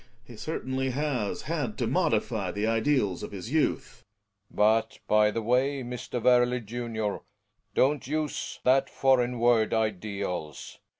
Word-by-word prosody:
He 120 0 -13
certainly 130 0 -3
has 130 -6 -2
had 145 -9 -3
to - - 0
modify - - 0
the 105 +1 -2
id 115 +2 0
eals 105 -11 +1
of - - -6
his 100 +4 -7
youth. 135 -5 0 0.5
Belling. - - -21 0.3
But, 110 - -19
by 105 0 +4
the 115 +1 -3
way, 130 +4 +1
Mr. 125 0 -5
Werle, 125 +1 +4
junior 110 -2 -3 0.3
— - - -46
don't 140 -1 +2
use 155 0 -3
that 130 +2 +3
foreign 125 -2 +2
word 115 -2 +3
"ideals.' 100 -7 -3
120 Hz, 145 wpm, -28 LUFS, 110-130 Hz, 0.5 s, by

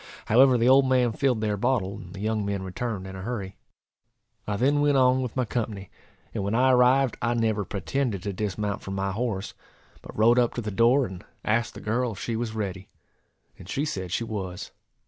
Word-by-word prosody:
However 125 +3 +5
the 115 +1 +2
old 135 0 +6
man 125 -2 +3
filled 125 -2 0
their 105 -1 0
bottle, 105 -4 0
and 90 0 -11
the - - -8
young 110 0 0
men 100 -1 -2
returned 100 0 -4
in 95 0 -8
a 95 - -7
hurry. 100 -3 -5 0.9
I 100 -1 -1
then 140 +5 +2
went 145 -1 +3
on 130 0 +4
with 125 -3 -4
my 130 -2 +1
company, 105 -4 -4 0.4
and - - -2
when 100 +3 -1
I 130 +2 +4
arrived 125 0 +4
I 120 +2 +1
never 110 -3 +1
pretended 105 0 -2
to 100 - -3
dismount 105 +1 -3
from 95 - -6
my 100 0 -1
horse, 105 -2 -3 0.5
but - - -11
rode 115 +3 +5
up 120 -1 +1
to 120 - -2
the 105 -1 -4
door, 120 +7 +4
and 90 -1 -8 0.2
asked 115 +1 0
the - - -8
girl 120 +2 -1
if 95 - -10
she 115 - -3
was 110 -1 -3
ready; 95 -3 -4 0.7
and 90 - -12
she 140 +5 -1
said 95 - -4
she 115 - 0
was. 95 -5 -5
110 Hz, 210 wpm, -26 LUFS, 100-125 Hz, 0.9 s, old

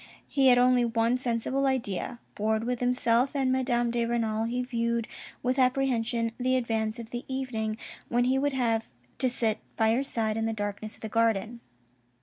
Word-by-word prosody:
He 270 -2 +3
had 250 -1 +7
only 250 0 +4
one 230 +1 +1
sensible 255 +3 0
idea. 240 -3 -2
Bored 220 +1 0
with 245 0 -2
himself 250 +1 +2
and 265 -2 +2
Madame 245 -2 +1
de 235 0 0
Renal, 225 -2 0
he 245 +2 -1
viewed 235 -2 -1 0.4
with 255 +2 +1
apprehension 245 -3 +1
the 255 +1 +2
advance 225 -2 -1
of 230 -1 -9
the 240 0 -4
evening 235 -5 -3 0.3
when 240 +1 +2
he 260 +2 +2
would 285 0 0
have 230 -4 0 0.3
to 255 - +3
sit 225 -3 0 0.2
by 220 -1 +3
her 255 +4 +1
side 225 -5 -1
in 225 0 0
the 225 - -1
darkness 205 0 -4
of - - -23
the 220 - -4
garden. 225 +1 +1
235 Hz, 180 wpm, -28 LUFS, 225-255 Hz, 0.4 s, had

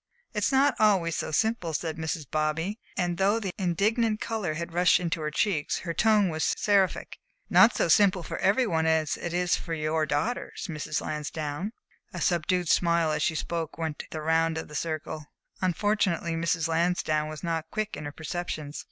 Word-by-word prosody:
"It's 210 +2 +1
not 275 +2 +4
always 190 -6 +3
so - - -2
simple," 180 0 0
said 160 +1 -2
Mrs. 160 -1 -3
Bobby, 160 - -1 0.2
and 175 0 -1
though 200 +4 +3
the 195 -4 -3
indignant 215 +5 +1
color 210 -9 -2
had 170 +1 -5
rushed 180 +1 +4
into 170 -2 -2
her 150 - -1
cheeks, 155 -1 0
her 170 -2 -3
tone 210 -1 +3
was 155 -1 0
seraphic, 200 -3 +1 0.3
"not 235 - +7
so - - +2
simple 185 +1 +4
for - - -5
every 205 +7 +3
one 160 -6 +1
as 160 -1 +2
it 175 - -5
is 175 0 +1
for 165 -2 -4
your 155 0 0
daughters, 150 +12 -2
Mrs. 150 -2 -3
Lansdowne." 150 +4 -4 0.4
A 175 - -4
subdued 175 +1 +1
smile 170 -1 +3
as 150 0 -1
she 160 - +1
spoke 165 0 -3
went 160 -2 -3
the 155 - -5
round 160 +1 +2
of 160 - -5
the - - -12
circle. 155 -1 -4 0.5
Fortunately 195 -5 +1
Mrs. 165 0 0
Lansdowne 160 -2 +1
was 155 +2 -8
not 165 -2 -2
quick 215 -1 -3
in 150 - -7
her 145 - -4
perceptions. 155 -2 -5
170 Hz, 180 wpm, -27 LUFS, 155-190 Hz, 0.5 s, not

